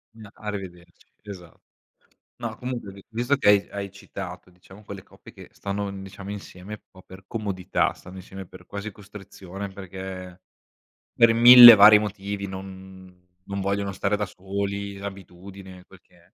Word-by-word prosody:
No, 110 -2 -13
arrivederci, 95 -5 -9 0.2
esa 95 -5 -11 0.9
no, - - -5
comunque 125 -5 -6
vi 100 0 -15
visto 120 +5 0
che 105 - +1
hai 100 -1 +4
hai 100 -1 -6
citato 95 -2 -9
diciamo 95 +3 -18
quelle 100 -2 -10
coppie - - -17
che - - -14
stanno, 100 +1 -4
mhmm, 95 0 -9
diciamo 95 +1 -9
insieme 100 -1 -10
un 105 - -9
po' 95 -1 -17
per 95 0 -15
comodità, 100 -5 -2
stanno 95 +1 -14
insieme 95 0 -10
per - - -16
quasi 100 +2 -7
costrizione 100 -1 -10
perché 95 -1 -9 0.7
per 115 -1 +4
1000 120 0 +11
vari 105 +1 +8
motivi 100 -1 -5
non 95 -1 -11 0.2
non 100 0 -4
vogliono 100 0 -2
stare 95 +2 -1
da 105 - -2
soli, 100 +1 -5
l'abitudine 95 -1 -11
quel - - -18
che - - -28
è. - - -24
100 Hz, 160 wpm, -24 LUFS, 95-100 Hz, 0.9 s, 1000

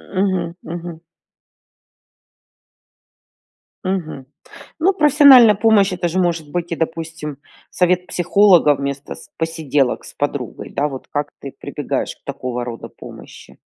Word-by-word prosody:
Мгм, 185 -3 0
мгм. 170 0 -6 2.9
Мгм. 170 -8 -3 0.5
Ну, 370 +5 +3
профессиональная 280 - +7
помощь- 210 -2 +3
это 175 -1 -1
же 175 +3 -1
может 170 -4 -1
быть 175 +1 -3
и, - - 0
допустим, 160 -2 -4 0.3
совет 180 0 +1
психолога 180 -5 +4
вместо 140 0 -5
с - - -15
посиделок 150 -5 -1
с - - -12
подругой, - - -4
да 145 - 0
вот. 135 -3 -8
Как 145 0 -2
ты 140 - -7
прибегаешь - - -4
к - - -38
такого 125 -1 -4
рода 115 -1 -7
помощи? - - -13
170 Hz, 125 wpm, -19 LUFS, 150-190 Hz, 2.9 s, профессиональная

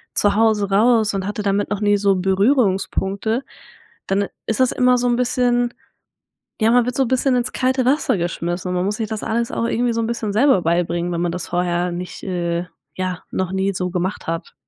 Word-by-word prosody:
zu 205 -1 +3
Hause 215 -3 +2
raus 220 +1 +3
und 195 -1 -2
hatte 210 0 -3
damit 200 0 0
noch 205 -1 -2
nie 205 0 +3
so 200 -1 +2
Berührungspunkte, 195 +2 +1 0.6
dann 200 +1 +1 0.2
ist 225 - -1
das 255 -1 +3
immer 250 0 +3
so 245 0 0
'n 240 - +2
bisschen 245 -1 +1 0.9
ja, 220 - +4
man 245 0 +4
wird 250 - -2
so 270 - +3
'n - - -3
bisschen 260 +1 +2
ins 245 0 -1
kalte 260 0 +1
Wasser 275 -5 +2
geschmissen, 175 +1 -3
und 180 - -2
man 180 - 0
muss 205 +2 -1
sich 220 - -2
das 215 0 -4
alles 230 +1 -1
auch - - -1
irgendwie 240 +1 0
so 230 - 0
'n 225 - -1
bisschen 225 -3 -3
selber 230 -5 +4
beibringen, 170 +1 0
wenn 170 - -2
man 175 -1 0
das 180 -1 -5
vorher 175 0 0
nicht, 180 0 -6
äh, 175 -2 -2 0.3
ja, 185 -1 -3
noch 185 -1 -1
nie 190 +1 0
so 180 0 -2
gemacht 180 +2 -3
hat. 165 0 -4
205 Hz, 215 wpm, -20 LUFS, 180-235 Hz, 0.9 s, ja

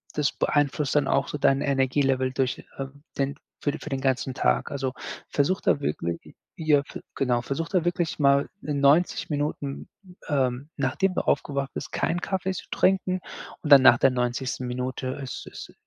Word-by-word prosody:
das 150 -2 +1
beeinflusst 145 -1 0
dann 140 -2 +3
auch - - +2
so 150 - -5
dein 135 0 +3
Energielevel 135 -1 +1
durch, 130 -2 -1
ähm, 140 +1 -7
den 140 0 0 0.3
für 145 - +1
für - - -7
den 135 -2 -2
ganzen 130 -1 0
Tag. 60 +1 +1
Also, 135 -2 -2 0.4
versuch 150 +6 +1
da - - +2
wirklich 85 - -2 0.4
j 160 - -7
ja, 145 -2 +5
ge - - -9
genau, 125 -3 +1
versuch 140 +7 -3
da 185 -4 +1
wirklich 175 -2 -1
mal 140 0 +4
in 145 -2 -2
90 145 +6 +3
Minuten, 145 -1 -3 0.4
ähm, 135 0 0
nachdem 145 +8 0
du - - +1
aufgewacht 140 -1 0
bist, 135 - -6
keinen 175 +2 -1
Kaffee 190 -1 -1
zu 185 - -7
trinken 185 -1 +1 0.4
und 150 - -3
dann 140 -2 +10
nach 120 -2 +8
der 135 - +4
90. 125 +1 -2
Minute 130 +1 -3 0.2
ist 125 - -7
ist - - -10
140 Hz, 180 wpm, -26 LUFS, 130-150 Hz, 0.4 s, dann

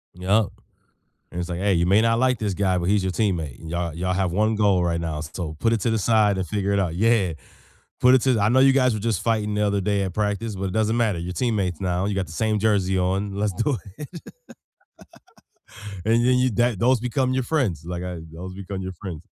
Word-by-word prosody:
Yep, 100 +4 +2 0.9
and 90 - -4
it's 85 - -4
like, 85 - -3
"Hey, 100 0 +1
you 85 0 +2
may 100 +4 +4
not 115 0 +2
like 130 -2 +2
this 105 -4 -2
guy, 95 -2 +1
but 85 - -3
he's 105 -1 +2
your 95 -1 -1
teammate 85 - -1
and 80 - -10
y'all 85 -1 -2
y'all 90 +2 -2
have 95 -2 0
1 110 +3 +1
goal 100 -4 +2
right 85 -1 0
now, 80 -2 -3
so, 80 0 -6
put 115 +5 +1
it 115 - +1
to 115 - 0
the 110 - +1
side 105 -2 +3
and 95 - -2
figure 100 -1 -1
it 100 - +2
out." 90 -4 -1
Yeah, 105 -2 +2 0.7
put 125 +1 +6
it 125 - +3
to 130 - +3
the 110 - +1
I 100 - +3
know 130 +2 +4
you 135 0 +6
guys 130 -3 +3
were 110 - -3
just 110 -3 -1
fighting 110 -2 0
the 105 - 0
other 100 -1 0
day 100 0 0
at 95 -2 -4
practice, 105 +1 -2
but 95 +1 -4
it 95 - -3
doesn't 110 +1 +1
matter, 110 -7 +1
you're 90 +2 -5
teammates 100 -8 -1
now, 90 0 -1
you 100 -1 -1
got 95 - -1
the 80 - -12
same 110 +5 0
jersey 95 -3 +1
on, 95 +2 -1
let's 105 -1 -1
do 115 +10 0
it. 100 -2 -8 2.1
and 115 +2 +3
then 125 0 +4
you 130 0 +2
that 120 0 +1
those 125 +3 +3
become 130 +1 0
your 130 - +1
friends, 120 - -1
like 90 0 -5
I 90 -2 -5
those 90 +3 -8
become 95 0 -6
your 95 0 -5
friends. 90 -3 -8
100 Hz, 250 wpm, -23 LUFS, 90-110 Hz, 2.1 s, put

